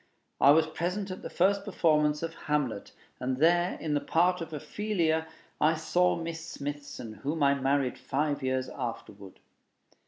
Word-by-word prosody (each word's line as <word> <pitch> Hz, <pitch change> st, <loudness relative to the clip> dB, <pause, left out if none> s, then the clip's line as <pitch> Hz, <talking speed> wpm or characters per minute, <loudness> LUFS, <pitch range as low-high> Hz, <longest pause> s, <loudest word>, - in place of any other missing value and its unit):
I 140 Hz, -, +6 dB
was 155 Hz, +2 st, +6 dB
present 180 Hz, +5 st, -3 dB
at 185 Hz, -, -6 dB
the -, -, -6 dB
first 195 Hz, +2 st, +2 dB
performance 150 Hz, -6 st, +2 dB
of 165 Hz, 0 st, -3 dB
'Hamlet,' 145 Hz, -10 st, -2 dB, 0.3 s
and 130 Hz, 0 st, -1 dB
there, 175 Hz, +4 st, +3 dB
in 155 Hz, -2 st, -2 dB
the 145 Hz, -, +2 dB
part 175 Hz, +5 st, +2 dB
of 165 Hz, -, -6 dB
Ophelia, 160 Hz, 0 st, -1 dB, 0.3 s
I 155 Hz, +2 st, +4 dB
saw 175 Hz, +3 st, +2 dB
Miss 165 Hz, -1 st, -5 dB
Smithson, 145 Hz, -7 st, -6 dB
whom 150 Hz, +2 st, -1 dB
I 140 Hz, 0 st, +5 dB
married 135 Hz, -1 st, 0 dB
five 145 Hz, +1 st, -1 dB
years 130 Hz, 0 st, -1 dB
afterward. 105 Hz, -6 st, -7 dB
155 Hz, 155 wpm, -29 LUFS, 140-170 Hz, 0.3 s, I